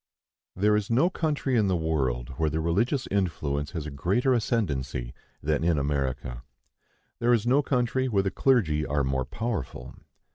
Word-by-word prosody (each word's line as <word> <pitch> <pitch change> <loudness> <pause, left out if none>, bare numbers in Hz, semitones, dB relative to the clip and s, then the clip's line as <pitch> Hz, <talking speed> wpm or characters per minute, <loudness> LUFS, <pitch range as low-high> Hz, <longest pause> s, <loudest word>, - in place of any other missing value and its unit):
There 105 +3 +3
is 105 -1 -1
no 135 +11 +3
country 150 -6 -1
in 110 -4 +3
the 95 - +2
world 65 -7 -1
where 80 -1 +1
the 80 - -2
religious 110 - +1
influence 75 -7 -1
has 80 -3 -4
a 75 - -5
greater 100 - +1
ascendency 70 - -1 0.3
than 75 +1 0
in 85 -2 +2
America. 70 -3 -2 0.8
There 120 +1 +3
is 115 -1 -2
no 130 +4 +4
country 130 -1 0
where 100 -5 +2
the 95 - -1
clergy 95 - +2
are 75 -1 0
more 65 -1 0
powerful. 85 - -4
85 Hz, 160 wpm, -27 LUFS, 70-120 Hz, 0.8 s, no